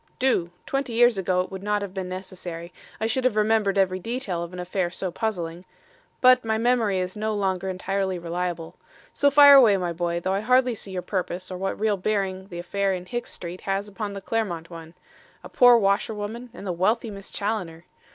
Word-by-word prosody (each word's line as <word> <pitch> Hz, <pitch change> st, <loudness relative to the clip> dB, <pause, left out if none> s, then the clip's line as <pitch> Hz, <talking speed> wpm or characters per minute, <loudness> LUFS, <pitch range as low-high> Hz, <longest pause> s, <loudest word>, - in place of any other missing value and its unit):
"Do. 250 Hz, -10 st, +1 dB, 0.2 s
Twenty 275 Hz, -3 st, -2 dB
years 240 Hz, -2 st, +4 dB
ago 180 Hz, -1 st, +1 dB
it 185 Hz, -, -6 dB
would 190 Hz, -1 st, -6 dB
not 205 Hz, 0 st, 0 dB
have 195 Hz, -2 st, -6 dB
been 190 Hz, -2 st, -4 dB
necessary. 180 Hz, -2 st, -7 dB, 0.3 s
I 220 Hz, -, -1 dB
should 240 Hz, +3 st, 0 dB
have 250 Hz, -4 st, +2 dB
remembered 215 Hz, -2 st, +2 dB
every 185 Hz, -1 st, +2 dB
detail 220 Hz, -4 st, -3 dB
of 170 Hz, 0 st, -6 dB
an 180 Hz, -, -9 dB
affair 180 Hz, 0 st, -1 dB
so 185 Hz, +1 st, -4 dB
puzzling. 175 Hz, -4 st, -3 dB, 0.6 s
But 255 Hz, 0 st, +6 dB
my 220 Hz, -1 st, 0 dB
memory 230 Hz, -4 st, +2 dB
is 185 Hz, 0 st, -3 dB
no 215 Hz, 0 st, -2 dB
longer 190 Hz, -2 st, -1 dB
entirely 190 Hz, 0 st, -2 dB
reliable. 170 Hz, -1 st, -4 dB, 0.4 s
So 285 Hz, -, +3 dB
fire 285 Hz, 0 st, +9 dB
away, 235 Hz, -8 st, +7 dB
my 175 Hz, -2 st, -2 dB
boy, 170 Hz, 0 st, -1 dB
though 185 Hz, +2 st, -1 dB
I 195 Hz, -, +1 dB
hardly 250 Hz, +2 st, +3 dB
see 205 Hz, -, -8 dB
your 185 Hz, -1 st, -4 dB
purpose 185 Hz, 0 st, -3 dB
or 185 Hz, -, -4 dB
what 195 Hz, 0 st, -3 dB
real 210 Hz, -1 st, +1 dB
bearing 190 Hz, -1 st, -2 dB
the 175 Hz, -, -8 dB
affair 195 Hz, +2 st, -1 dB
in 180 Hz, 0 st, -7 dB
Hicks 240 Hz, +5 st, -4 dB
Street 175 Hz, +1 st, -7 dB
has 195 Hz, +1 st, -2 dB
upon 205 Hz, 0 st, -5 dB
the 195 Hz, -, -6 dB
Clermont 185 Hz, -6 st, -3 dB
one. 165 Hz, 0 st, -10 dB, 0.5 s
A -, -, -9 dB
poor 245 Hz, -1 st, +7 dB
washerwoman 215 Hz, +3 st, -1 dB
and 230 Hz, -, -10 dB
the 185 Hz, -, -1 dB
wealthy 215 Hz, +6 st, 0 dB
Miss 200 Hz, -1 st, -9 dB
Challoner! 180 Hz, -6 st, -3 dB
195 Hz, 205 wpm, -25 LUFS, 180-220 Hz, 0.6 s, fire